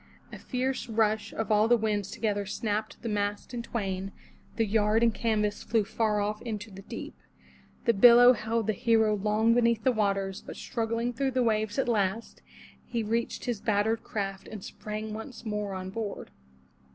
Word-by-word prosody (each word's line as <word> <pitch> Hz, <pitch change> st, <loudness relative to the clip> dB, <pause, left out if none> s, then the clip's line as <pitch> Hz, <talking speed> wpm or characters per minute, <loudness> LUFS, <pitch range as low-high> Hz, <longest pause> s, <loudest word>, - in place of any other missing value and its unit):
A -, -, -7 dB
fierce 255 Hz, -1 st, -2 dB
rush 215 Hz, -1 st, +1 dB
of 225 Hz, 0 st, -3 dB
all 215 Hz, +1 st, +4 dB
the 240 Hz, +1 st, +5 dB
winds 210 Hz, -3 st, -1 dB
together 205 Hz, -2 st, -1 dB
snapped 215 Hz, +1 st, -3 dB
the -, -, -3 dB
mast 205 Hz, +1 st, -2 dB
in 240 Hz, -, -3 dB
twain; 195 Hz, -5 st, -3 dB, 0.4 s
the 225 Hz, -, +2 dB
yard 215 Hz, +1 st, +2 dB
and 230 Hz, -1 st, +4 dB
canvas 210 Hz, -1 st, 0 dB
flew 225 Hz, -1 st, +1 dB
far 215 Hz, 0 st, 0 dB
off 210 Hz, +1 st, -2 dB
into 220 Hz, -2 st, -5 dB
the 195 Hz, 0 st, -10 dB
deep. 195 Hz, -, -7 dB, 0.7 s
The 235 Hz, -, +4 dB
billow 245 Hz, +4 st, +8 dB
held 225 Hz, -1 st, -1 dB
the 215 Hz, -, +1 dB
hero 220 Hz, +1 st, +3 dB
long 215 Hz, +3 st, +2 dB
beneath 235 Hz, -2 st, +2 dB
the 260 Hz, -, +4 dB
waters, 195 Hz, -3 st, -1 dB
but -, -, -9 dB
struggling 230 Hz, 0 st, -2 dB
through 270 Hz, +3 st, 0 dB
the 255 Hz, -, +4 dB
waves 215 Hz, -1 st, 0 dB
at 270 Hz, -, +1 dB
last, 215 Hz, -1 st, -1 dB, 0.4 s
he 235 Hz, -2 st, -3 dB
reached 230 Hz, +2 st, -2 dB
his 235 Hz, -5 st, -2 dB
battered 220 Hz, +1 st, +1 dB
craft 195 Hz, -2 st, -4 dB
and 210 Hz, -3 st, -8 dB
sprang 215 Hz, 0 st, -6 dB
once 225 Hz, +3 st, -8 dB
more 210 Hz, -2 st, -3 dB
on 185 Hz, 0 st, -5 dB
board. 210 Hz, -1 st, -5 dB
220 Hz, 175 wpm, -28 LUFS, 205-230 Hz, 0.7 s, billow